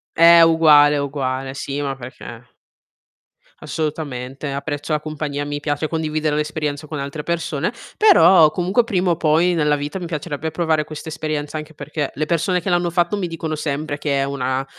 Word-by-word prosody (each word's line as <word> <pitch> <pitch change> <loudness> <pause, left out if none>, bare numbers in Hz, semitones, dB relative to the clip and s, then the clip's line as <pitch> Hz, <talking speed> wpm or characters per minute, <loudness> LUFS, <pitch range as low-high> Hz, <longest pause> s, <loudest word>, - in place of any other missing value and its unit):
Eh, 170 0 +8
uguale, 150 -3 +6
uguale, 135 -2 -3
sì 140 +1 -4
ma 140 -1 -2
perché 120 -1 -10 1.1
Assolutamente. 145 -3 -4
Apprezzo 145 +2 -4
la 150 - +1
compagnia, 150 -1 -4
mi 145 0 -4
piace 145 +1 -2
condividere 155 -1 -1
l'esperienza 150 -1 -3
con 150 -1 -5
altre 140 +2 -5
persone, 165 0 -2 0.3
però 180 - +6
comunque 190 +7 +1
prima 185 -4 0
o 165 - 0
poi 165 +3 +3
nella 150 -2 +2
vita 145 +5 -4
mi 180 - -5
piacerebbe 160 -1 -4
provare 160 -2 0
questa 155 +1 -8
esperienza, 155 -1 -4
anche 155 +1 -8
perché 145 -1 -4
le 155 - -2
persone 175 +2 0
che 190 - -3
l'hanno 175 0 +1
fatto 175 +3 +1
mi 190 - -2
dicono 160 -1 -4
sempre 150 0 -3
che 145 -2 -1
è - - +1
una 130 -1 -2
155 Hz, 170 wpm, -20 LUFS, 145-165 Hz, 1.1 s, Eh